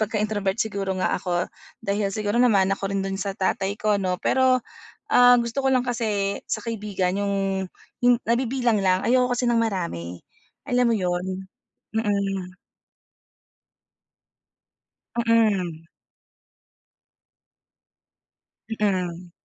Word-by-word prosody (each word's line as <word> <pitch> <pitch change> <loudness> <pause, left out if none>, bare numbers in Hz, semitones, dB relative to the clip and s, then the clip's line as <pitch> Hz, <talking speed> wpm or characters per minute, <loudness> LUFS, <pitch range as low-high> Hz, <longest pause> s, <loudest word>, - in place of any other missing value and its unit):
pagka-introvert 210 -2 -1
siguro 200 -3 -1
nga - - +1
ako. 180 -1 -1 0.3
Dahil 200 0 -1
siguro 210 +1 -1
namana 200 -6 +4
ko 195 - -3
rin 195 - 0
do'n 195 0 -3
sa 200 0 -2
tatay 195 +1 -1
ko 210 -1 +2
'no, 185 -2 -2
pero, 260 -1 +3 0.5
ah, 245 -7 +7
gusto 235 +3 -2
ko - - +2
lang 255 -1 +3
kasi 215 -5 -1
sa 215 - -2
kaibigan 205 -5 -2
'yong 200 0 0 0.7
hin 245 -1 +5
nabibilang 240 -1 +1
lang. 185 -1 +2
Ayoko 250 0 +3
kasi 245 0 0
ng 230 - +3
marami, 170 - -3 0.4
alam 250 0 +2
mo 230 - +3
'yon? 185 0 -2 0.5
Mm. 195 -4 -1 2.6
Mm. 210 -8 +2 2.9
Mm. 180 -5 -1
205 Hz, 110 wpm, -24 LUFS, 190-230 Hz, 2.9 s, ah